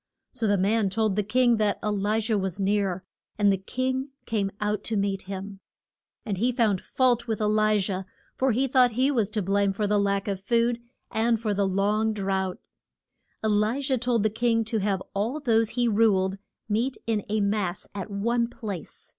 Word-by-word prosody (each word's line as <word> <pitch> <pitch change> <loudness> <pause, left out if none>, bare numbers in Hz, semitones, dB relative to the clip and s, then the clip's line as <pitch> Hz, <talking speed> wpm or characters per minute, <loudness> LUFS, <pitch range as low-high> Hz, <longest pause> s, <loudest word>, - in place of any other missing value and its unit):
So 235 -4 -2
the 205 0 +3
man 200 +2 +2
told 215 0 0
the 210 - +2
king 240 +3 +3
that 210 -2 +1
E - - +1
li 210 +1 +1
jah 220 0 0
was 190 -1 -2
near, 195 -2 0 0.3
and 205 -1 +4
the - - 0
king 260 +7 -2 0.2
came 205 -4 0
out 210 0 -1
to 225 - -1
meet 195 -1 -2
him. 195 0 -6 0.7
And 200 -4 -2
he 245 +4 +2
found 220 -6 +1
fault 250 -2 +1
with 220 -2 -1
E - - -1
li 215 0 +3
jah, 190 -1 -2 0.3
for 265 0 +2
he 260 +4 +1
thought 250 -2 +4
he 260 +5 +2
was 225 -7 +1
to 210 -1 -2
blame 200 +1 +2
for 210 +2 -1
the 205 0 +2
lack 200 0 0
of 195 -2 -2
food, 235 +2 +1 0.3
and 225 +1 +1
for 215 -2 -1
the 200 0 +1
long 210 +3 +1
drouth. 190 -2 -1 0.9
E - - +3
li 215 +4 +2
jah 270 -1 0
told 240 -2 +1
the 215 - +2
king 230 0 +1
to 225 0 -1
have 195 -2 -1
all 225 +9 -1
those 225 -5 +2
he 240 0 0
ruled 200 -3 +2 0.3
meet 230 +5 0
in 220 -3 0
a 215 +1 +1
mass 200 -2 -1
at 200 +1 -5
one 235 +4 0
place. 205 -7 -7
210 Hz, 200 wpm, -26 LUFS, 200-230 Hz, 0.9 s, and